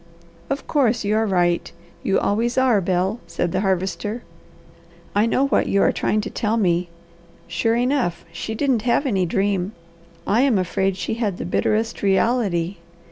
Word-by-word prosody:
"Of 275 +1 -2
course 245 -6 +2
you 210 +1 +1
are 220 0 +2
right! 175 -3 +1 0.3
You 195 - +1
always 230 +4 0
are, 250 -6 +4
Bel!" 185 +4 0
said 170 0 -2
the 185 - 0
Harvester. 195 +4 -1 0.9
"I 210 +3 +3
know 265 +4 +2
what 275 - +1
you 200 - +2
are - - +4
trying 215 - 0
to - - -5
tell 225 0 0
me. 175 -4 +1 0.6
Sure 170 +7 0
enough, 245 -9 0
she 195 +6 -5
didn't 260 -2 +1
have 245 +5 +1
any 195 -8 +1
dream. 195 +2 0 0.5
I 220 +5 +3
am 265 -6 +3
afraid 190 +1 0
she - - -2
had 215 -5 -2
the - - -5
bitterest 215 +5 0
reality. 195 -3 +1
205 Hz, 165 wpm, -22 LUFS, 185-230 Hz, 0.9 s, are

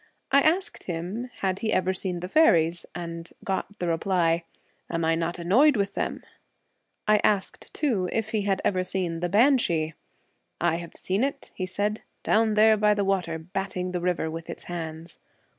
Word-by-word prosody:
I 280 +1 +6
asked 345 +6 0
him 185 +8 -4
had 190 -1 0
he 220 - -1
ever 185 -1 +2
seen 180 -2 -3
the 180 - -4
faeries, 175 - +3
and 170 -1 -6
got 200 +1 -3
the 175 - -2
reply, 170 -1 +1 0.2
' - - -41
Am 165 -1 -1
I 165 - +3
not 165 +2 -1
annoyed 240 - +4
with 200 -1 0
them? - - -3 0.4
' - - -50
I 215 0 +6
asked 200 -2 0
too 220 - 0
if 220 -1 -1
he 215 -1 0
had 195 -2 0
ever 185 -2 +2
seen 180 -3 -2
the 175 +1 -1
banshee. 200 - +3 0.7
I 170 -1 +2
I - - 0
have 170 -1 -9
seen 195 +6 0
it,' 275 0 -3
he 185 - -3
said, 205 +3 -1 0.2
'down 220 -1 +3
there 215 0 +6
by 210 0 +4
the 200 -1 0
water, 180 -4 0
batting 185 +2 -4
the 180 -1 -2
river 175 -2 0
with 165 0 -7
its - - -7
hands.' 165 -1 -7
185 Hz, 190 wpm, -26 LUFS, 170-210 Hz, 0.7 s, I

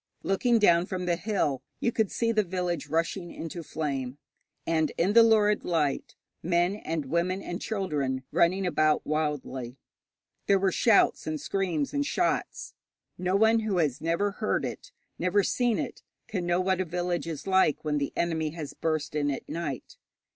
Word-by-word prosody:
Looking 235 +5 +2
down 175 -4 +4
from 180 -1 -3
the 175 -1 +2
hill, 170 - -1 0.2
you 240 - +1
could 220 -4 +1
see 230 -1 +1
the 220 -1 +3
village 175 -4 -2
rushing 165 +3 -1
into 165 +1 -6
flame, 140 -5 -3 0.5
and 160 -2 +1
in 185 +5 +2
the 230 - +8
lurid 215 -2 +4
light 150 -5 -1 0.3
men 175 +3 +1
and 160 -7 -3
women 175 +6 -1
and 175 - -5
children 145 -11 -2
running 185 +3 +2
about 155 -3 +2
wildly. 145 -5 -2 0.7
There 200 - +5
were 190 0 +1
shouts 215 -3 +3
and 155 -1 -2
screams 170 -3 -1
and 285 - +1
shots. 350 +4 -1 0.5
No 185 +1 0
one 220 +2 +4
who 215 -4 -1
has 150 -7 0
never 170 +5 0
heard 215 +2 -1
it, - - -7 0.3
never 195 +3 +2
seen 240 +2 +1
it, - - -4 0.3
can 185 -5 -3
know 175 +1 +2
what 185 0 +1
a - - -1
village 175 0 -2
is 160 -4 -5
like 190 -6 +2
when 150 -1 +1
the 140 - -2
enemy 160 -2 0
has 150 -3 -6
burst 155 -3 -2
in 145 -1 0
at 135 - -4
night. 150 -6 -5
175 Hz, 170 wpm, -28 LUFS, 155-195 Hz, 0.7 s, the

